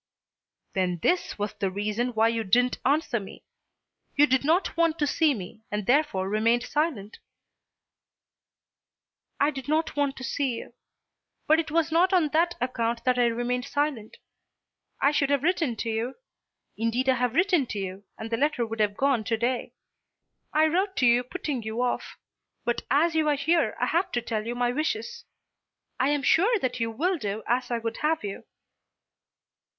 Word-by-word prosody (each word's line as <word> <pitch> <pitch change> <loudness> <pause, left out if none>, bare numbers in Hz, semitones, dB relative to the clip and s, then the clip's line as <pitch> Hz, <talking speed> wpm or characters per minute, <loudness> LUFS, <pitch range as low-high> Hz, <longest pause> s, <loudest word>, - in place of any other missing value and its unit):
"Then 180 -2 0
this 360 0 +1
was 205 0 -3
the 195 - -2
reason 210 +5 -2
why 225 +1 +4
you 230 -1 -1
didn't 245 +5 +2
answer 280 -3 +1
me. 195 - -11 0.7
You 290 - +6
did 260 -1 +1
not 330 +6 +1
want 330 -1 +2
to 295 - +1
see 300 0 +2
me, 195 +1 -9
and 210 -1 -3
therefore 250 -8 +2
remained 225 +4 +2
silent." 285 -10 -2 2.2
"I 285 +2 +3
did 270 -2 -7
not 315 +2 0
want 285 -1 0
to 260 - -7
see 265 -1 -1
you. 230 - -9 0.7
But 315 +1 +4
it 320 - -2
was 320 +1 +1
not 360 +4 +3
on 340 -5 +3
that 340 +3 +2
account 235 -2 -1
that 250 0 +2
I 240 - +4
remained 245 +2 -1
silent. 280 -6 -2 0.8
I 280 - +4
should 285 -2 +1
have 285 -1 +1
written 330 -7 +1
to 225 - -3
you. 230 +4 -2 0.6
Indeed 230 +4 -1
I 260 -1 +4
have 245 -1 0
written 350 -6 +3
to 210 - -5
you, 190 0 -5
and 220 +1 -7
the 230 - +1
letter 280 -3 +1
would 225 0 -6
have 205 -1 +1
gone 270 -5 +2
to 225 - 0
day. 245 +2 -2 0.8
I 310 +1 +4
wrote 375 +5 0
to 255 - +2
you 240 +1 +5
putting 275 -1 -4
you 220 +3 -2
off. 250 - -2 0.5
But 240 0 0
as 325 +4 +3
you 315 -1 +2
are 295 - +3
here 325 +4 +1
I - - +2
have 345 +3 0
to 240 - 0
tell 220 -2 -3
you 240 - -3
my 245 0 +1
wishes. 435 - -3 0.7
I 260 - +3
am 290 -1 0
sure 425 +12 +4
that 255 -9 -2
you 230 0 0
will 335 +10 -1
do 210 -1 -3
as 245 +2 0
I 240 - 0
would 230 0 -4
have 310 -2 0
you." 200 -1 -6
255 Hz, 180 wpm, -26 LUFS, 230-310 Hz, 2.2 s, You